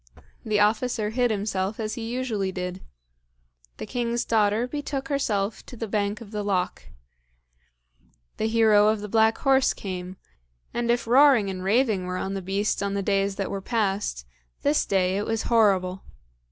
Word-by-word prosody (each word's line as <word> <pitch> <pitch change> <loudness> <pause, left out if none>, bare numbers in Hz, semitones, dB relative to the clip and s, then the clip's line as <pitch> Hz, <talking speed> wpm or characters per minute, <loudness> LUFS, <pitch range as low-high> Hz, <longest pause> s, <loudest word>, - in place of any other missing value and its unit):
The 215 -2 0
officer 215 +1 +1
hid 245 +1 +1
himself 200 -1 -2
as 215 -1 -2
he 230 -1 -5
usually 225 -7 -2
did. 180 0 -5 1.0
The - - -6
king's 235 -1 -2
daughter 215 +1 +2
betook 280 -1 -4
herself 215 -7 -1
to 245 - -10
the 225 - -4
bank 205 0 -1
of 215 -3 -11
the 210 -1 -3
loch. 190 -3 -1 1.5
The 220 - 0
hero 220 -2 +4
of 215 -1 +1
the 210 - -5
black 220 +1 +3
horse 270 -1 +3
came, 185 -1 -6 0.6
and 235 0 -2
if 240 0 +1
roaring 245 -4 +5
and 185 -1 -6
raving 210 -2 +1
were 180 0 -3
on 190 +1 -3
the 195 - -3
beast 195 +4 -1
on 200 0 -1
the 200 - -1
days 195 0 +1
that 195 - -3
were 195 - -3
passed, 195 - -1 0.4
this 290 +1 +2
day 190 -1 +1
it 205 - -2
was 225 -1 -1
horrible. 195 -5 +2
210 Hz, 165 wpm, -25 LUFS, 195-235 Hz, 1.5 s, roaring